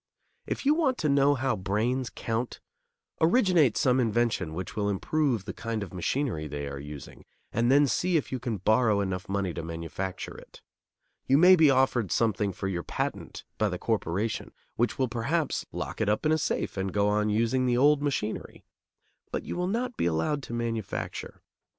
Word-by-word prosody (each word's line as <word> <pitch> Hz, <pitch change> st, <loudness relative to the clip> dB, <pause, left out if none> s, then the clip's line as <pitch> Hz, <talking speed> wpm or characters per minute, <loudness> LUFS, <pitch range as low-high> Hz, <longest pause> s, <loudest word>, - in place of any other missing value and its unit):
If -, -, -3 dB
you 290 Hz, -, +5 dB
want 295 Hz, -6 st, +1 dB
to 155 Hz, -, 0 dB
know 140 Hz, +1 st, +4 dB
how 130 Hz, 0 st, 0 dB
brains 115 Hz, +7 st, -1 dB
count, 115 Hz, +2 st, -3 dB, 0.6 s
originate 170 Hz, -, +4 dB
some 130 Hz, 0 st, +3 dB
invention 115 Hz, -8 st, 0 dB
which 95 Hz, +1 st, -5 dB
will 105 Hz, -1 st, 0 dB
improve 120 Hz, +2 st, 0 dB
the 95 Hz, -, -5 dB
kind 115 Hz, -2 st, -3 dB
of 95 Hz, -, -9 dB
machinery 90 Hz, -, -1 dB
they 70 Hz, -1 st, -5 dB
are 70 Hz, 0 st, -6 dB
using, 75 Hz, 0 st, -9 dB, 0.3 s
and 120 Hz, +2 st, +2 dB
then 145 Hz, +2 st, +6 dB
see 175 Hz, +5 st, +1 dB
if 150 Hz, -, -3 dB
you 130 Hz, -, -2 dB
can 115 Hz, -3 st, -3 dB
borrow 110 Hz, +2 st, +3 dB
enough 95 Hz, -1 st, -3 dB
money 95 Hz, -3 st, -1 dB
to 85 Hz, -, -4 dB
manufacture 85 Hz, +3 st, -5 dB
it. -, -, -14 dB, 0.6 s
You 135 Hz, -, +5 dB
may 180 Hz, +4 st, +8 dB
be 160 Hz, -4 st, +6 dB
offered 130 Hz, -6 st, +2 dB
something 105 Hz, -3 st, +1 dB
for 95 Hz, -, -4 dB
your 90 Hz, -3 st, -2 dB
patent -, -, -4 dB, 0.2 s
by -, -, +2 dB
the -, -, -3 dB
corporation, 105 Hz, +6 st, -2 dB, 0.2 s
which 120 Hz, +1 st, 0 dB
will 130 Hz, -, +1 dB
perhaps 130 Hz, +7 st, -1 dB
lock -, -, -5 dB
it 105 Hz, -, +2 dB
up 105 Hz, +8 st, 0 dB
in 155 Hz, -, +3 dB
a 155 Hz, -, +4 dB
safe -, -, -2 dB
and 95 Hz, 0 st, -1 dB
go 100 Hz, +1 st, +2 dB
on 105 Hz, +1 st, +1 dB
using 115 Hz, +4 st, +1 dB
the 120 Hz, -1 st, +2 dB
old 145 Hz, +2 st, +4 dB
machinery; 135 Hz, -7 st, -3 dB, 0.7 s
but -, -, -2 dB
you -, -, -5 dB
will 180 Hz, +1 st, -1 dB
not 240 Hz, +4 st, -2 dB
be -, -, +1 dB
allowed 85 Hz, -, 0 dB
to 120 Hz, -, -8 dB
manufacture. 115 Hz, -3 st, -4 dB
115 Hz, 185 wpm, -28 LUFS, 95-140 Hz, 0.7 s, may